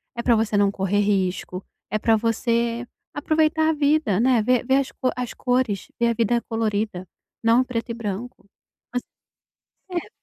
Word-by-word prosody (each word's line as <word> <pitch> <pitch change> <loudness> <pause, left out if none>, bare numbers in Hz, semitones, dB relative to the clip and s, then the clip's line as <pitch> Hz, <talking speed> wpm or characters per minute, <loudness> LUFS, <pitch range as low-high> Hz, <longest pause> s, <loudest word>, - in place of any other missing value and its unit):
é 235 - -2
pra 240 -1 +4
você 215 -1 +1
não 200 -1 +3
correr 195 +1 0
risco, 190 -2 0 0.3
é 215 - +1
pra 225 +1 +3
você 230 +1 0 0.3
aproveitar 315 +1 +2
a - - +3
vida, 290 -8 +2
né. 245 -1 +4
Ver 250 +2 +2
ver 265 +1 +3
as 275 -1 -1
co 255 - -1
as 250 -1 -4
cores, 245 -6 0
ver 235 - +3
a - - +2
vida 235 +1 +1
colorida, 215 -4 -1 0.4
não 230 +3 +5
preto 240 -2 -4
e - - -2
branco. 220 -1 -6 0.4
Mas, 245 - 0 0.9
eh 350 +1 -3
230 Hz, 170 wpm, -23 LUFS, 210-255 Hz, 0.9 s, não